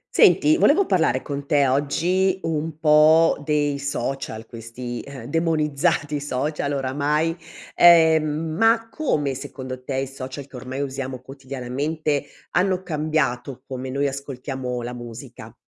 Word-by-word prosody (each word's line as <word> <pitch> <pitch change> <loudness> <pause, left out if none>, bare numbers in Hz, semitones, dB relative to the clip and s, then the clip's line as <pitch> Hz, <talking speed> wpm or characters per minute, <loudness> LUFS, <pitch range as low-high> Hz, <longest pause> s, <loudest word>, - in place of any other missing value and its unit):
Senti 310 +1 +5
volevo 355 +4 +4
parlare 160 - +1
con 140 -1 -5
te 145 -3 +3
oggi 175 +8 +1
un 160 -1 -2
po' 155 0 +5
dei 145 -1 0
social, 135 -4 -4
questi, 115 +1 -7
ehm, 140 -4 -10
demonizzati 150 -1 0
social 145 +1 -2
oramai, 145 +4 0 0.4
ehm, 160 -2 +6 0.3
ma 225 +3 +3
come 150 - 0
secondo 130 -1 -7
te 135 +1 -4
i 135 +1 0
social 135 +1 -7
che 140 - -15
ormai 130 +2 -5
usiamo 135 -2 -4
quotidianamente 140 +3 -3 0.3
hanno 185 0 +1
cambiato 145 -6 -2
come 130 0 -6
noi 140 +2 -1
ascoltiamo 130 -2 -5
la 120 +1 -5
musica? 120 -2 -10
140 Hz, 125 wpm, -23 LUFS, 130-160 Hz, 0.4 s, ehm